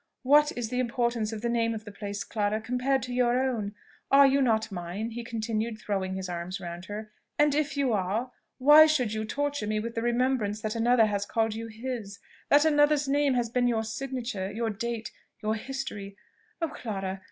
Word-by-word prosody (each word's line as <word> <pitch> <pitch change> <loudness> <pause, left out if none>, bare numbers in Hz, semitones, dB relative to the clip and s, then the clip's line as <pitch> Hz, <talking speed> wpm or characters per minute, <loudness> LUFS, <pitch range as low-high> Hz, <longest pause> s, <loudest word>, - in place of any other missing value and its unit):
What 295 +3 +5
is 235 -2 -2
the 250 +1 -2
importance 235 -2 0
of 220 0 -6
the - - +1
name 230 -1 +1
of 220 0 -7
the 205 - -8
place, 205 0 -5
Clara, 210 -1 -1
compared 250 +4 0
to 250 -1 -5
your 245 0 +2
own? 225 -6 -1 0.3
Are 280 0 +7
you 275 +1 +4
not 225 -3 +1
mine?" 190 +5 -4
he 240 +1 -5
continued, 225 -1 -2
throwing 195 -3 -2
his 190 -1 -4
arms 175 +2 -4
round 175 0 -7
her; 210 +2 -7 0.3
"and 295 -1 +4
if 290 -1 0
you 270 -4 +2
are 210 +6 -1 0.3
why 295 +4 +8
should 255 -8 +1
you 220 0 -2
torture 285 -1 -2
me 215 0 0
with 230 +2 -4
the 230 - -2
remembrance 240 -3 +1
that 215 0 -2
another 230 0 +4
has 205 -1 -1
called 225 -1 0
you 225 +1 -5
his? 225 -3 -6 0.3
that 290 +2 +6
another's 295 -1 +4
name 280 -1 +2
has 235 -2 0
been 245 0 +2
your 225 -2 +1
signature, 230 -4 -4
your 225 +1 -2
date, 230 +2 -4 0.3
your 215 +1 +1
history? 220 -5 -5 0.5
Oh, 330 - +1
Clara! 195 -8 -4
230 Hz, 195 wpm, -28 LUFS, 210-255 Hz, 0.5 s, why